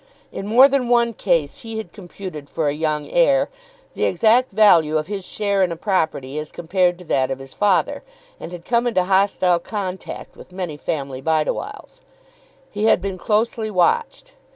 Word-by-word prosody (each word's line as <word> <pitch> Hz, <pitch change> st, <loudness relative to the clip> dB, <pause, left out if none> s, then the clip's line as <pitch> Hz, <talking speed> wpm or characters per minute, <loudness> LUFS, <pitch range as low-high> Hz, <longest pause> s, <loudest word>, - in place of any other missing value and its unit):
In 195 Hz, -, -6 dB
more 245 Hz, +5 st, +7 dB
than 270 Hz, -3 st, 0 dB
one 235 Hz, -1 st, +3 dB
case 170 Hz, -8 st, 0 dB
he 225 Hz, -1 st, -7 dB
had 220 Hz, -, -7 dB
computed 180 Hz, -6 st, -9 dB
for 155 Hz, -, -1 dB
a 145 Hz, -, +1 dB
young 150 Hz, -1 st, -2 dB
heir -, -, +3 dB, 0.4 s
the -, -, -1 dB
exact 230 Hz, +7 st, +3 dB
value 170 Hz, -7 st, +4 dB
of 155 Hz, -, -2 dB
his 200 Hz, +1 st, -5 dB
share 200 Hz, 0 st, -1 dB
in 180 Hz, -2 st, +2 dB
a -, -, -3 dB
property 160 Hz, -7 st, -1 dB
as 150 Hz, 0 st, -7 dB
compared 175 Hz, +1 st, 0 dB
to 180 Hz, -, -13 dB
that 130 Hz, -4 st, +1 dB
of 135 Hz, -, -3 dB
his 135 Hz, 0 st, -12 dB
father, 205 Hz, -3 st, +1 dB, 0.4 s
and -, -, -8 dB
had 175 Hz, -1 st, -9 dB
come 235 Hz, 0 st, +1 dB
into 205 Hz, -6 st, +1 dB
hostile 190 Hz, -2 st, +2 dB
contact 190 Hz, 0 st, -6 dB
with -, -, -14 dB
many 180 Hz, -4 st, -5 dB
family 140 Hz, -3 st, -4 dB
Bideawhiles. 160 Hz, -, -2 dB, 0.7 s
He 210 Hz, +1 st, -2 dB
had 220 Hz, -, +4 dB
been 190 Hz, 0 st, -5 dB
closely 220 Hz, +2 st, 0 dB
watched. 460 Hz, -, 0 dB
185 Hz, 175 wpm, -21 LUFS, 160-220 Hz, 0.7 s, more